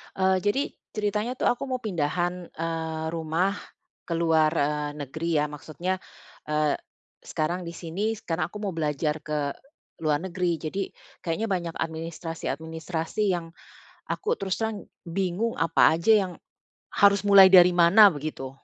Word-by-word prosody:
Eee, 190 0 +3
jadi 235 +7 +2 0.3
ceritanya 210 +3 -1
tuh, 255 - +1
aku 245 +3 -1
mau 255 -2 -3
pindahan, 175 -2 -1
eee, 160 -1 -3
rumah 165 +4 -1 0.5
ke 170 - -3
luar, 160 -2 +3
eee, 150 -1 0
negeri 160 +5 -4
ya, - - +1
maksudnya, 160 +5 -4 0.5
eee, 150 -1 +1 0.5
sekarang 170 +3 -2
di 170 - -6
sini, 185 +7 -2
sekarang 180 -6 -2
aku 210 - -8
mau 200 -3 -2
belajar 150 0 0
ke 150 -2 -2 0.5
luar 150 -1 +2
negeri, 180 -2 -1
jadi 195 +5 -3 0.4
kayaknya 175 +7 -1
banyak 170 -3 -2
administrasi-administrasi 165 +2 -4
yang 170 -2 -4 0.6
aku 465 +2 -1
terus 190 - -3
terang 220 -2 -2 0.2
bingung 190 +5 -1
apa 165 -1 +4
aja 170 +7 +2 0.2
yang 180 - -8 0.6
harus 200 -1 +4
mulai 195 -2 +8
dari 180 -1 +8
mana, 185 +5 +8
begitu. 150 -4 -5
170 Hz, 140 wpm, -26 LUFS, 160-195 Hz, 0.6 s, mulai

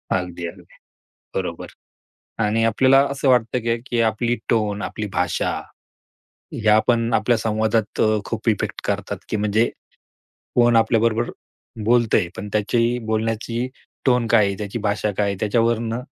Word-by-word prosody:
अगदी, 90 -1 -3
अगदी. 85 - -11 0.7
बरोबर - - -3 0.8
आणि 110 +2 +1
आपल्याला 130 +4 +5
असं 140 0 -1
वाटतं 125 -1 +3
का, 115 0 +2
की 120 - 0
आपली 115 +1 +1
टोन, 105 -3 0
आपली 105 - -4
भाषा, 90 0 0 1.0
ह्यापण 115 +2 +2
आपल्या 120 -2 +3
संवादात 110 0 0 0.2
खूप - - -4
इफेक्ट - - -1
करतात, - - -2
की - - -1
म्हणजे 105 +2 +1 0.8
कोण 120 -1 +4
आपल्याबरोबर 115 +1 +2 0.5
बोलतंय. 115 -5 +3
पण 105 - -6
त्याची 115 +3 +1
बोलण्याची 115 +2 -1 0.4
टोन 125 -2 +3
काय 105 -1 +4
आहे? 100 - -1
त्याची 105 +2 -4
भाषा 105 0 -1
काय 105 - +2
आहे? 100 -1 -1
त्याच्यावरनं 115 +2 0
115 Hz, 130 wpm, -22 LUFS, 105-120 Hz, 1.0 s, आपल्याला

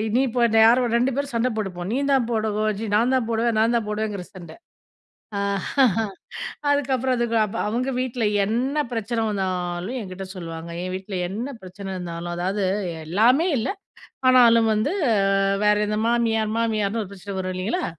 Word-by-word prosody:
நீ - - +4
இப்ப, 245 +1 -1 0.3
யாரோ? 245 +2 +5 0.2
2 250 +3 +2
பேரும் 280 -3 -3
சண்ட 240 +2 +2
போட்டுப்போம். 185 -3 -4
நீந்தான் 270 -2 +1
போடவு 215 -1 0 0.2
ஜி 225 - -3
நான் 240 +4 +3
தான் 240 -3 0
போடுவேன். 230 0 +1
நான் 230 +2 +3
தான் 225 -3 0
போடுவேங்கிற 210 -3 -3
சண்ட. 180 -3 -10 2.2
அதுக்கப்புறம் 265 -3 +1
அதுக்கு 235 -1 0
அப் 200 - -8
அவுங்க 245 +5 -1
வீட்ல 250 -2 -2 0.2
என்ன 255 +7 0
பிரச்சனை 225 0 -2
வந்தாலும், 185 +2 -2
எங்கிட்ட 190 -1 -7
சொல்வாங்க. 165 -1 -7
என் 185 0 -4
வீட்ல 190 0 -5
என்ன 230 +8 -4
பிரச்சனை 190 +1 -8
இருந்தாலும், 175 -1 -5
அதாவது, 190 +3 -1 0.4
எல்லாமே 235 - +3
இல்ல. 225 - -1 0.6
ஆனாலும் 230 -3 +6
வந்து, 220 - 0 0.7
வேற 210 0 +5
எந்த 210 0 -1
மாமியார் 225 -2 +1
மாமியார்ன்னு 220 -1 0
ஒரு 190 - -12
பிரச்சன 200 0 -7
வரும். 185 0 -3
இல்லைங்களா? 220 - -1
220 Hz, 150 wpm, -23 LUFS, 190-240 Hz, 2.2 s, ஆனாலும்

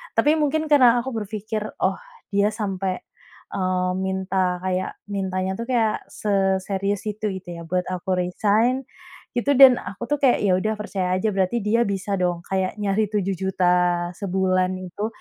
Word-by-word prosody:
Tapi, 300 +2 +4
mungkin 310 +1 +1
karena 245 -4 +6
aku 265 - -4
berpikir, 215 0 -4 0.2
oh, - - +1 0.3
dia 200 +1 +3
sampai, 195 -3 -2 0.6
eee, 185 -1 0
minta 190 -1 0
kayak 185 0 -2 0.2
mintanya 190 -1 -1
tuh 230 - -3
kayak 225 -4 +1
seserius 195 0 0
itu, 210 0 -3
gitu 175 - -13
ya, - - -8
buat 180 0 0
aku 185 0 -2
resign 215 +8 +1 0.5
gitu, 280 +4 +2
dan 260 -2 +8
aku 200 +4 -7
tuh 295 - +2
kayak 255 -3 +5
ya 190 - +4
udah 215 +3 -1
percaya 190 -3 -2
aja 210 +4 0
berarti 190 +4 0
dia 230 +3 +3
bisa 200 0 -2
dong, 175 -1 -1
kayak 190 0 -1
nyari 205 +1 +1
7 200 -2 -1
juta 180 -1 +1
sebulan 185 -1 +1
itu, 185 +3 -4
195 Hz, 160 wpm, -23 LUFS, 185-215 Hz, 0.6 s, dan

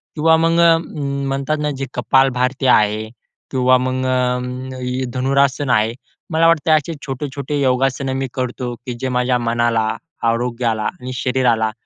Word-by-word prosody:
किंवा 160 +1 +4
मग 165 +1 +2
अ, 165 -1 +6
म्हणतात 140 -1 -3
ना 150 0 0
जे 135 - -3
कपाल 135 0 +3
भारती 130 +2 0
आहे 105 -3 +3 0.5
किंवा 130 -1 +4
मग 130 +1 -2
अ, 125 0 -2
धनुरासन 135 +1 +1
आहे. 110 0 +2 0.4
मला 165 +1 +4
वाटतं 160 -1 +3
असे 160 +3 -3
छोटे-छोटे 140 +1 -3
योगासनं 130 +1 +1
मी 135 0 -2
करतो, 125 -1 -3
की 125 +1 -7
जे 130 - -1
माझ्या 125 0 +1
मनाला, 115 -1 +1 0.4
आरोग्याला 115 -1 -1
आणि 130 -5 -5
शरीराला 125 -3 +1
130 Hz, 140 wpm, -19 LUFS, 125-140 Hz, 0.5 s, अ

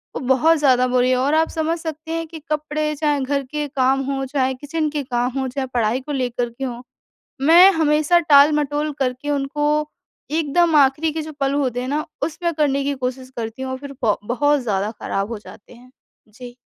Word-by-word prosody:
वो - - -2
बहुत 305 +6 +4
ज़्यादा 255 -4 +3
बुरी 250 0 +2
है 255 - +3
और 270 +4 +1
आप 320 +1 +2
समझ 325 +1 -1
सकते 320 0 -6
हैं 330 0 -3
कि 320 0 -9
कपड़े, 305 0 -1
चाहे 295 -1 0
घर 280 +1 -1
के 295 +3 -4
काम 270 0 +1
हो, 270 -1 -2
चाहे 265 -1 0
किचन 305 +4 -3
के 285 - -1
काम 245 0 -1
हो, 265 - -1
चाहे 265 +1 -4
पढ़ाई 235 +1 +1
को 295 - -7
लेकर 245 -3 -2
के 235 +3 -9
हो, 245 -2 -5 0.6
मैं 340 +7 +7
हमेशा 310 +1 +3
टाल-मटोल 295 -1 +3
करके 260 +2 -2
उनको 290 +1 0 0.6
एकदम 320 +1 +2
आख़िरी 295 +3 +3
के 320 - -3
जो 310 +1 -8
पल 275 0 +1
होते 255 -4 -1
हैं 250 - -4
ना 300 +2 -1 0.2
उसमें 335 +3 -2
करने 285 -3 +1
की 285 - -1
कोशिश 255 0 -6
करती 225 +2 -5
हूँ 260 - -4
और 260 - -4
फिर 280 0 -9
ब 210 -2 +3
बहुत 290 +5 +1
ज़्यादा 205 -2 -1
ख़राब 195 +1 -2
हो 225 - -4
जाते 205 +1 -15
हैं। 250 +2 -18 0.4
जी। 245 +3 -12
280 Hz, 205 wpm, -21 LUFS, 255-305 Hz, 0.6 s, मैं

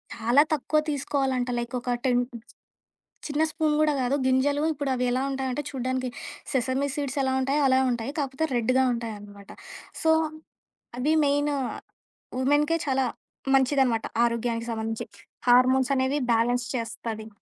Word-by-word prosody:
చాలా 240 +5 +4
తక్కువ 305 +1 +1
తీసుకోవాలంటా. 270 -3 -1
లైక్ 240 +2 -5
ఒక 250 - -5 0.2
10 245 -1 +3 1.1
చిన్న 295 +1 -1
స్పూన్ 310 -1 +1
గూడా 305 -1 +3
కాదు. 255 +2 +1
గింజలు 270 +3 +2
ఇప్పుడు 285 -1 -3
అవి 250 0 0
ఎలా 255 +1 0
ఉంటాయంటే, 265 +1 -2
చూడ్డానికి 255 -1 -2 0.4
సెసమి 260 +1 0
సీడ్స్ 280 -2 -3
ఎలా 265 0 +1
ఉంటాయో 275 +3 +1
అలా 260 0 +4
ఉంటాయి. 240 +2 -2
కాపోతే, 275 +2 -1
రెడ్‌గా 255 +3 +2
ఉంటాయన్నమాట. 205 -3 -7 0.5
సో, 320 - +2 0.9
అది 295 +5 +1
మెయిన్ 290 +1 +2 0.9
వుమెన్‌కి 290 +5 +2
చాలా 265 -1 +1 0.5
మంచిదనమాట 265 -4 +3 0.2
ఆరోగ్యానికి 235 0 -1
సంబంధించి. 225 0 -3 0.4
హార్మోన్స్ 255 +2 +5
అనేవి 265 +2 +1
బ్యాలెన్స్ 235 +1 +1
చేస్తది. 225 -1 -4
260 Hz, 130 wpm, -26 LUFS, 240-280 Hz, 1.1 s, హార్మోన్స్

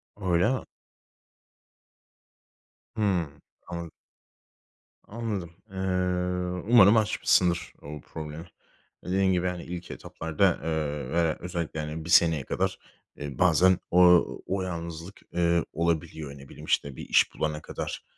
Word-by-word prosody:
Öyle 90 0 +2
mi? 130 - -4 2.3
Hımm 90 -8 -1 0.3
anladım. 85 -1 -6 1.1
Anladım. 105 -6 -4 0.2
Eee, 95 - -9 1.0
umarım 105 0 +8
aşmışsındır 90 -5 +2
o 75 0 -8
problemi. 80 +1 -8 0.6
Dediğin 95 +1 +2
gibi, 90 0 +1
hani, 90 -1 -4
ilk 90 0 -7
etaplarda, 80 +3 0
eee, 75 -4 -2
ve - - -3
de 85 -2 +2
özellikle, 85 -3 -4
hani, 75 +1 -5
1 - - -7
seneye 80 -5 +5
kadar, - - -1 0.4
eee, 70 -3 -6
bazen 90 +1 +5
o 90 0 +7 0.2
o 95 0 -1
yalnızlık, 85 +1 -6
eee, 85 -1 +2
olabiliyor. 80 -2 -1
Ne 70 -1 -13
bileyim, - - -11
işte, 70 -2 0
bir - - -8
iş - - +4
bulana 75 0 -2
kadar, - - -6
85 Hz, 120 wpm, -27 LUFS, 80-90 Hz, 2.3 s, umarım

